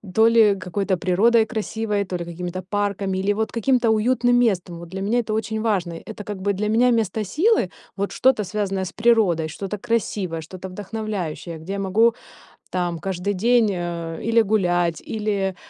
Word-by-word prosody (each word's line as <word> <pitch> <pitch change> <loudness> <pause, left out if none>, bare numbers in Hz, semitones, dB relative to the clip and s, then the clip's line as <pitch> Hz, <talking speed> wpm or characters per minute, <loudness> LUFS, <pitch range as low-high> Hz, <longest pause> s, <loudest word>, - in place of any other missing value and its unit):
то 225 +1 +6
ли 220 -3 +5
какой-то 190 +1 -2
природой 220 +6 +3
красивой, 220 -2 -2
то 185 -1 -3
ли 170 - -5
какими-то 175 +2 -5
парками, 200 -2 -1
или 200 +2 +1
вот 220 +1 -2
каким-то 240 0 +2
уютным 245 +2 +2
местом. 185 -7 +1
Вот 170 -1 -10
для 190 +1 -5
меня 220 +5 +1
это 215 -1 -4
очень 220 0 -2
важно. 190 -7 0
Это 210 +5 -8
как 205 -1 -5
бы 200 +1 +1
для 210 +2 -2
меня 240 +3 +4
место 225 -2 0
силы, 300 - +2 0.3
вот 200 +1 -2
что-то 255 -5 +3
связанное 195 -1 -2
с - - -6
природой, 210 -9 +3
что-то 200 +5 -5
красивое, 200 -7 -2
что-то 185 +3 -8
вдохновляющее, 190 -4 -5
где 185 +5 -6
я 200 - -3
могу 220 +5 +3 0.5
там 175 -2 -2
каждый 190 +2 -2
день, 230 +3 +3
э, 170 -2 -4
или 230 0 +5
гулять, 175 -6 +1
или, 200 -3 -1
200 Hz, 175 wpm, -22 LUFS, 180-220 Hz, 0.5 s, то